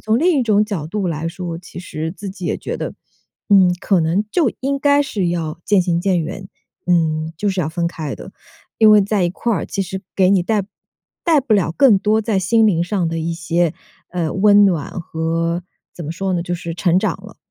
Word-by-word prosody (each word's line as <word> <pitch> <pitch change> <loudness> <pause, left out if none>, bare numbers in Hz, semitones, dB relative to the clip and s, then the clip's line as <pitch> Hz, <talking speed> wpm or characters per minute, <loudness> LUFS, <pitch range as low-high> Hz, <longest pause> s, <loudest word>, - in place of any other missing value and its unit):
从 220 +1 +1
另 340 -2 +3
一 - - +2
种 210 -2 +3
角 195 -8 -4
度 195 +1 -2
来 160 -1 -3
说， 170 0 -5
其 175 0 -10
实 160 -2 -5
自 200 0 -7
己 185 -2 -7
也 - - -1
觉 - - -5
得， - - -5 0.5
嗯， 190 -4 +5
可 195 -2 +2
能 170 +6 +1
就 300 -6 +2
应 275 +1 -1
该 285 +1 +3
是 205 -9 -2
要 160 -2 -3
渐 205 -3 +3
行 175 -1 0
渐 180 -2 +1
远， 190 +4 -6 0.4
嗯， 160 -2 +1
就 205 - -1
是 190 -1 -1
要 155 - -1
分 170 +1 -1
开 160 -4 -5
的。 - - -10 0.5
因 220 -1 +7
为 210 - +7
在 200 -2 0
一 175 - 0
块 230 +5 -2
儿， 205 - -2
其 195 - -2
实 190 +1 -5
给 185 -1 +3
你 195 -2 +4
带 210 +2 0 0.6
带 320 -4 +4
不 255 -4 -1
了 190 -6 +2
更 250 -8 +6
多 215 +2 +2
在 220 -2 0
心 220 +5 +3
灵 170 -4 +1
上 180 -2 -1
的 165 0 -3
一 165 +1 -2
些， 165 0 0 0.4
呃， 170 -3 -2
温 205 +1 +5
暖 170 -7 0
和 165 +1 -2 0.3
怎 170 - -8
么 155 - -4
说 190 +2 -2
呢， 175 - 0
就 175 0 -3
是 170 -1 -5
成 175 +1 +2
长 - - +1
了。 - - -12
185 Hz, 240 characters per minute, -19 LUFS, 170-210 Hz, 0.6 s, 因